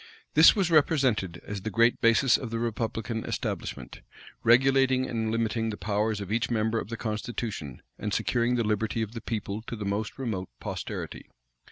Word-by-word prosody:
This 155 +2 +8
was 190 -5 +1
represented 130 - +2
as 100 -1 -5
the 110 - -3
great 115 +2 +3
basis 115 +2 +5
cf 125 - -5
the 115 - -3
republican 115 0 -2
establishment, - - -4 0.4
regulating 130 +2 +4
and 110 -2 -2
limiting 115 0 0
the 105 - -4
powers 105 0 0
of 100 -1 -6
each 115 +2 0
member 110 -1 +1
of - - -6
the 115 - -4
constitution, 105 - -4 0.2
and 105 - -3
securing 115 +4 +1
the 120 - +1
liberty 110 +1 0
of 110 - -5
the 115 -1 -7
people 105 -2 -4
to - - -4
the 105 -2 -5
most 100 +2 -2
remote 110 -9 -3
posterity. - - -6
115 Hz, 175 wpm, -28 LUFS, 105-120 Hz, 0.4 s, This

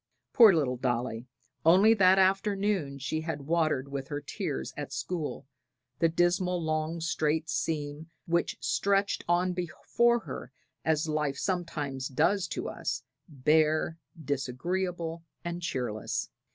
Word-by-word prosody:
Poor 225 -4 +9
little 140 -8 +1
Dolly! 120 -1 -2 0.4
only 190 +7 +7
that 190 -3 +5
afternoon 195 -5 +1
she 150 +4 -2
had 155 -3 -4
watered 155 -4 +1
with 135 -1 -4
her 145 -1 -3
tears, 65 - -4
at - - -5
school, 170 -8 -4 0.5
the 165 - +4
dismal 175 +2 +1
long 155 0 -1
straight 160 -1 0
seam, 150 0 -2 0.2
which 170 0 0
stretched 200 0 +1
on 180 +1 +2
before 235 +7 +1
her - - -7 0.3
as 160 0 +1
life 150 -3 -1
sometimes 150 -8 -2
does 175 +8 +1
to - - -4
us, - - -3 0.3
bare, 155 +3 +2 0.3
disagreeable 165 +5 -2 0.2
and 170 0 -3
cheerless. 125 -10 -3
160 Hz, 125 wpm, -29 LUFS, 145-180 Hz, 0.5 s, Poor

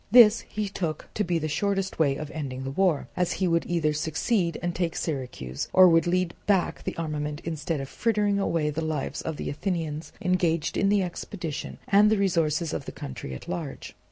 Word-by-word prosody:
This 225 -1 +8
he 210 0 -2
took 170 -5 -4
to 210 - 0
be 175 -3 0
the 155 -1 -1
shortest 195 +4 -1
way 140 -4 +3
of 150 +1 -6
ending 130 -4 -4
the 135 - -3
war, 175 -1 +2
as 180 -1 +1
he 190 - 0
would 170 -1 +1
either 160 -3 +1
succeed 165 +4 0
and 175 0 -2
take 170 -2 -1
Syracuse, 125 - -3
or 185 0 +9
would 165 0 +4
lead 180 -1 +1
back 195 -4 +1
the - - -3
armament 150 -2 -3
instead 160 -1 -2
of 135 - -4
frittering 205 - +1
away 165 -6 +1
the 155 +2 -3
lives 155 -3 -2
of 160 -2 -4
the - - -3
Athenians 160 -1 -3
engaged 180 -5 +1
in 195 - +2
the 205 -1 +3
expedition 175 -3 -5
and 205 +1 +6
the 215 - +3
resources 165 -4 +1
of - - -3
the - - -5
country 65 0 -7
at - - -10
large. 170 -6 -5
165 Hz, 200 wpm, -27 LUFS, 150-190 Hz, -, or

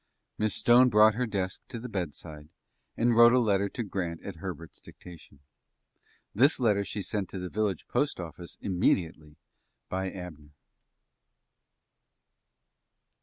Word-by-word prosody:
Miss 110 -1 +1
Stone 125 +2 +5
brought 110 -1 +6
her 125 +3 -1
desk 95 -3 -3
to 120 -3 -7
the 125 - -7
bedside, 80 - -6 0.5
and 120 0 +2
wrote 120 +1 +7
a 130 - +5
letter 100 -4 +1
to 120 - -4
Grant 90 -5 -4
at 95 -4 -7
Herbert's 85 -2 -8
dictation. 85 -5 -15 0.9
This 135 +8 +4
letter 105 -5 +2
she 100 +1 -5
sent 100 0 -3
to - - -7
the 90 0 -5
village 105 -4 -2
postoffice 85 - -3
immediately 85 -5 -1 0.5
by 95 +1 -2
Abner. 80 -5 -10
95 Hz, 125 wpm, -28 LUFS, 85-110 Hz, 0.9 s, wrote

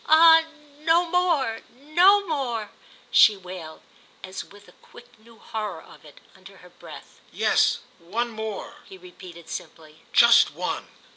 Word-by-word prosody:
"Ah 325 +1 +7 0.4
no 330 +3 +2
more—no 340 - +1
more!" 245 - -4 0.4
she 210 -2 +6
wailed, 180 -4 -10 0.4
as 190 0 -7
with 205 0 -18
a - - -17
quick 240 -1 -18
new 230 +1 -20
horror 210 -7 -6
of - - -18
it, 150 -2 -17
under 190 +1 -16
her 180 -1 -18
breath. - - -14
"Yes, - - +1 0.2
one 225 +8 -4
more," 220 -2 -7
he 190 - -13
repeated, 180 -2 -14
simply; 155 -1 -10
"just 235 0 +5
one!" - - -4
220 Hz, 135 wpm, -24 LUFS, 185-295 Hz, 0.4 s, Ah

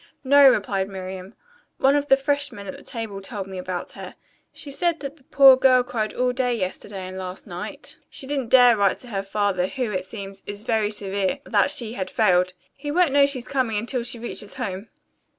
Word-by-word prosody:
"No," 280 0 +7
replied 195 -4 0
Miriam. 190 +1 -8 0.4
"One 270 +2 +4
of 290 0 0
the 270 - +5
freshmen 285 -6 -2
at 190 - -6
the - - -13
table 220 -4 -6
told 195 0 -5
me 190 -1 -7
about 180 -1 -5
her. - - -10 0.4
She 285 - -9
said 340 +3 0
that 285 +2 -6
the 275 - -24
poor 270 -2 +7
girl 255 -1 +4
cried 225 -3 -3
all 250 0 +1
day 250 -1 0
yesterday 190 -1 -5
and 185 0 -7
last 185 0 -7
night. 185 - -7
She - - -3
didn't 270 -4 -3
dare 245 -2 +7
write 200 +1 +1
her 215 -6 -4
father, 195 -2 0
who, 250 -1 -3
it 185 -2 -3
seems, 195 -1 -8
is 205 +1 -7
very 220 -2 +1
severe, 200 -2 -1
that 205 -3 +2
she 230 -2 0
had 190 -6 -4
failed. 180 0 +2 0.2
He 290 +1 -7
won't 340 0 +3
know 280 0 +5
she's 260 -3 -3
coming 255 -6 0
until 240 +4 -1
she 240 0 -4
reaches 225 -3 -6
home." 205 -5 -5
225 Hz, 205 wpm, -23 LUFS, 195-265 Hz, 0.4 s, No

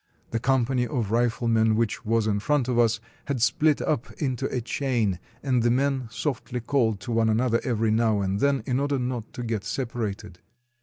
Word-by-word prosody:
The 115 - 0
company 125 0 +1
of 120 -8 -2
riflemen, 115 -1 +2
which 115 0 -1
was 115 -1 +1
in 105 -1 +1
front 140 +3 +1
of 125 -2 +1
us, 115 -1 +3 0.3
had 140 -2 -1
spHt 150 +5 +2
up 135 -6 -1
into 130 -5 -2
a 125 - -2
chain, 115 -6 -1 0.2
and 130 -3 +2
the 120 - +3
men 135 0 +1
softly 125 -2 -3
called 115 -4 +1
to 120 - -5
one 115 -1 +2
another 115 +1 +2
every 115 -3 +1
now 110 -1 +2
and 95 +1 -1
then 140 +1 +2
in 130 -1 0
order 140 0 0
not 125 -3 -3
to 125 - -5
get 110 -4 -2
separated. 105 -5 -4
120 Hz, 190 wpm, -26 LUFS, 110-130 Hz, 0.3 s, us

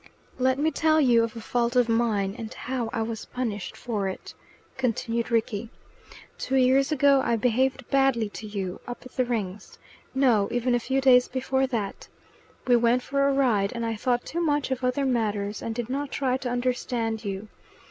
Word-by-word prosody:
"Let 260 +1 +2
me 310 +3 +1
tell 315 0 +3
you 240 -5 +5
of 230 0 -3
a 230 - -6
fault 240 +2 -1
of 245 -2 +4
mine, 225 -4 +1
and 225 -1 -7
how 250 -3 -3
I 225 - -1
was 225 0 -5
punished 220 -6 -4
for 210 -5 -2
it," 190 - -7 0.4
continued 235 -2 -1
Rickie. 230 -1 -1 0.7
"Two 270 - -2
years 265 +2 +4
ago 280 -2 +4
I 235 - +1
behaved 255 +3 +1
badly 270 -5 +3
to 215 +1 -8
you, 195 -3 -4
up 245 - -7
at 255 - -11
the 255 - 0
Rings. 210 -5 -4 0.4
No, 240 -7 +3
even 245 +1 0
a 240 - +3
few 265 +3 -1
days 250 -2 +6
before 265 +1 0
that. 220 -6 -4 0.6
We 245 - +5
went 240 +2 +2
for 275 0 +1
a - - +3
ride, 235 -8 +2
and 235 -1 -3
I 225 0 -1
thought 245 +2 0
too 340 - -3
much 290 -4 0
of 260 0 -2
other 250 +2 +1
matters, 210 -5 -1
and 225 - -4
did 240 -1 -3
not 280 +2 -3
try 260 -2 0
to 260 -2 -4
understand 245 -2 -1
you. 200 0 -4
245 Hz, 190 wpm, -26 LUFS, 225-265 Hz, 0.7 s, days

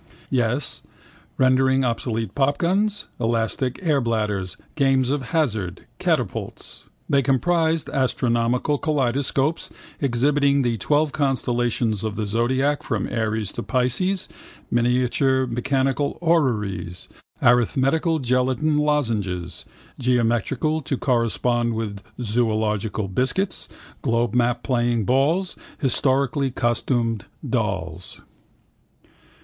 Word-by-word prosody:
Yes, 125 +2 0 0.6
rendering 130 0 +3
obsolete 115 -3 -2
popguns, 180 +10 +1
elastic 120 +3 0
airbladders, 110 - 0 0.2
games 135 -2 +2
of 140 -3 -2
hazard, 110 - -1
catapults. - - -2 0.2
They 140 -1 +3
comprised 160 +4 +1
astronomical 125 +1 +1
kaleidoscopes 140 +1 0 0.3
exhibiting 140 +2 +2
the 120 -2 0
twelve 150 +7 +2
constellations 120 -6 0
of 110 -2 -2
the 110 0 -2
zodiac 130 +7 +1
from 110 -5 -2
Aries 110 -3 -1
to - - -5
Pisces, 150 +10 0 0.4
miniature 125 +2 +2
mechanical 135 +3 0
orreries, 105 - 0 0.3
arithmetical 135 +7 +3
gelatine 130 +3 +1
lozenges, 105 - -1 0.3
geometrical 125 +5 +1
to 140 -1 -2
correspond 120 -1 +1
with 105 -3 -4 0.2
zoological 110 -3 0
biscuits, 130 - -1 0.3
globemap 120 0 +1
playing 120 -3 +1
balls, 155 - +2 0.2
historically 135 0 +1
costumed 120 -3 0 0.2
dolls. - - -2
125 Hz, 90 wpm, -23 LUFS, 115-140 Hz, 0.6 s, rendering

